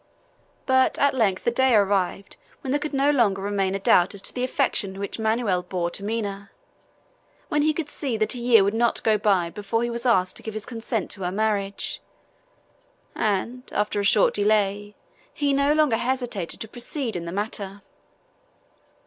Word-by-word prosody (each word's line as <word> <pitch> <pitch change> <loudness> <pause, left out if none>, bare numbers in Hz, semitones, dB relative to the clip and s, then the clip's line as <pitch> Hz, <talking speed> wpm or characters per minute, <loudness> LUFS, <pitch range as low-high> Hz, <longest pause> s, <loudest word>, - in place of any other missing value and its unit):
But 260 -1 +3
at 280 0 +3
length 210 -7 +1
the 235 - +1
day 260 0 +3
arrived 195 -1 +1 0.3
when 260 - -4
there 290 - +1
could 300 +1 -4
no 280 +1 +2
longer 225 -9 +2
remain 195 -1 -1
a - - -2
doubt 185 0 +3
as 195 - -6
to - - -4
the 250 - -3
affection 250 -7 0
which 200 +2 -5
Manoel 220 -4 +1
bore 175 -1 -3
to 200 - -6
Minha, 200 -2 -3 1.0
when 295 - +1
he 310 +1 +3
could 310 0 -3
see 270 -5 -2
that 215 +2 0
a 250 - -5
year 235 -4 +5
would 200 +1 0
not 235 +1 +1
go 215 -2 +3
by 190 -5 +2
before 210 +4 -2
he 240 - -1
was 235 +2 -2
asked 185 -6 +2
to - - -4
give 220 -1 -7
his 215 0 -4
consent 225 -3 -3
to 200 - -2
her 180 - -1
marriage, 200 -1 -1 1.1
and 220 +4 -1
after 210 0 0
a - - 0
short 200 0 +4
delay 205 0 +1 0.4
he 285 -2 0
no 280 +1 +3
longer 300 -6 +3
hesitated 245 -8 -3
to 220 - -4
proceed 240 0 -4
in 170 -1 -4
the 170 - -5
matter. 200 0 -4
215 Hz, 185 wpm, -24 LUFS, 195-245 Hz, 1.1 s, year